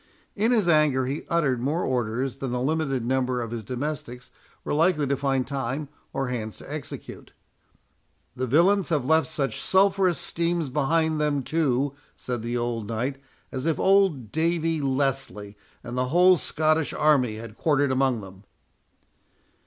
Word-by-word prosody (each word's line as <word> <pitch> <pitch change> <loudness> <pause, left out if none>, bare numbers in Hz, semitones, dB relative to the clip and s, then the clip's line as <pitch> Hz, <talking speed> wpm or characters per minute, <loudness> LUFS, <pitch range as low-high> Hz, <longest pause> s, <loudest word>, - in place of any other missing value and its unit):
In 220 +3 +2
his 220 -7 +2
anger 150 -5 +3
he 140 +4 -4
uttered 140 -8 +1
more 150 +7 0
orders 125 +1 -1
than 135 -2 -4
the 125 - -1
limited 135 -2 -1
number 130 0 0
of 115 -2 -4
his 115 -2 -4
domestics 130 +1 -5 0.3
were - - -2
likely 155 -1 +3
to 140 +1 +1
find 135 -2 0
time 140 +1 -3 0.2
or 135 -2 -2
hands 110 -4 -4
to - - -9
execute. - - -8 1.0
"The 130 +1 -2
villains 180 - +3
have 150 -6 0
left 160 0 +3
such 135 0 -2
sulphureous 190 -2 +3
steams 170 -3 -1
behind 155 +3 +1
them, 145 -2 0
too," 140 -3 0 0.2
said 125 -2 -4
the 120 +2 -2
old 120 -3 -2
knight, 120 +5 -2 0.3
"as 130 +3 -3
if 160 - 0
old 190 - +3
Davie 165 -1 0
Leslie 135 -7 -1 0.3
and 120 0 -6
the 125 0 +1
whole 180 +6 +5
Scottish 155 0 0
army 135 -7 +3
had 110 0 -9
quartered 145 -2 +1
among 130 -3 +1
them." 95 0 -12
135 Hz, 155 wpm, -25 LUFS, 125-160 Hz, 1.0 s, whole